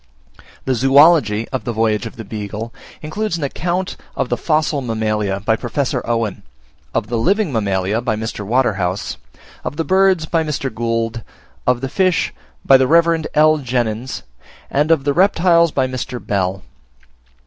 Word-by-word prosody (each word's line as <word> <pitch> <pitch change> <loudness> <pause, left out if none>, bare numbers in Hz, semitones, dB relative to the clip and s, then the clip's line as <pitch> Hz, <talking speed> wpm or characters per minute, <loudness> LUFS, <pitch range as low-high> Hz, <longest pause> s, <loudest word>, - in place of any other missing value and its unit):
The 130 - +1
Zoology 135 -4 +4
of 130 - -3
the 120 - -2
Voyage 110 0 0
of - - -11
the 115 - -7
Beagle 105 +2 -6 0.3
includes 170 +4 -2
an 160 - -5
account 175 +6 -2 0.2
of - - -1
the 120 - +1
Fossil 155 +2 0
Mammalia, 110 -4 -1
by 110 +2 +2
Professor 125 +4 -2
Owen; 115 -4 -1 0.5
of 115 - -1
the 115 +1 -2
Living 195 - +1
Mammalia, 100 0 0
by 120 -4 -1
Mr. 110 -1 -4
Waterhouse; 100 -5 0 0.5
of 145 - -5
the 165 - 0
Birds, 190 -3 +3
by 165 0 0
Mr. 140 -5 -3
Gould; 115 0 -2 0.5
of 125 -1 +2
the 135 - -2 0.2
Fish, 185 -3 +1 0.3
by 135 - +7
the 130 0 +2
Rev. 165 0 +3
L. 155 +1 +5
Jenyns; 120 -2 -2 0.5
and 145 +3 +1
of 160 -4 +3
the 145 0 +1
Reptiles, 170 -2 +4
by 135 -2 +1
Mr. 130 -1 -4
Bell. 95 -3 -2
125 Hz, 160 wpm, -18 LUFS, 110-155 Hz, 0.5 s, by